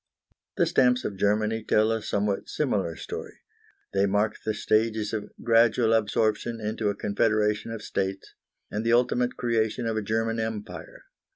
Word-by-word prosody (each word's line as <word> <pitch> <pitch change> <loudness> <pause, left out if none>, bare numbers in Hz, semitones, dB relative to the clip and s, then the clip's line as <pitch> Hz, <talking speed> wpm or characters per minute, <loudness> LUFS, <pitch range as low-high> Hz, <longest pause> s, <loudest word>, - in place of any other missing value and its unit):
The - - +4
stamps 125 -1 +3
of 100 - -3
Germany 105 +3 +1
tell 110 +1 +3
a 115 -1 -1
somewhat 100 -1 -1
similar 100 - -1
story. - - -7 0.6
They 100 +1 +3
mark 105 +2 +1
the 110 - -1
stages 110 0 +1
of 105 -2 -3
gradual 115 0 +4
absorption 110 +1 +1
into 110 0 -1
a 100 - -2
confederation 105 +1 +1
of 115 -1 -6
states, 95 0 -3 0.4
and 105 +2 -2
the 115 0 +2
ultimate 125 0 +2
creation 115 0 0
of 115 -1 -1
a - - 0
German 115 +2 -1
Empire. 110 -2 -6
110 Hz, 155 wpm, -26 LUFS, 105-115 Hz, 0.6 s, The